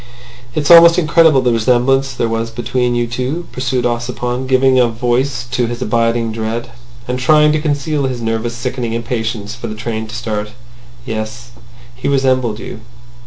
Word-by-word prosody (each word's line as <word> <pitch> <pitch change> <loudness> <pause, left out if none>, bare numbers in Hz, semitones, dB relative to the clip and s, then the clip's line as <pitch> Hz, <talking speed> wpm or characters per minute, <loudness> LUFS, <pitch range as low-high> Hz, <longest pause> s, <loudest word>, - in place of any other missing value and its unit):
"It's 155 +1 +1
almost 170 0 +9
incredible 160 -4 +4
the 125 -2 +1
resemblance 125 +4 +2
there 120 -2 -1
was 115 0 -2
between 120 +1 -1
you 120 0 +1
two," 130 +8 -3
pursued 130 -1 -2
Ossipon, 120 +1 -2
giving 130 0 +3
a 125 - +4
voice 120 +2 -1
to 125 -1 0
his 120 0 -5
abiding 115 -1 0
dread, 115 +2 -4 0.4
and 125 +1 -2
trying 150 +3 +4
to 155 0 0
conceal 145 -1 -1
his 125 -2 -4
nervous, 115 +1 -2
sickening 120 -1 -3
impatience 110 -2 -3
for 120 0 -7
the 110 - -6
train 110 0 -4
to 110 - -8
start. 105 -3 -4 0.5
"Yes; 115 +1 -5 0.4
he 125 - -4
resembled 130 -5 +1
you." 110 - -8
120 Hz, 165 wpm, -16 LUFS, 115-130 Hz, 0.5 s, almost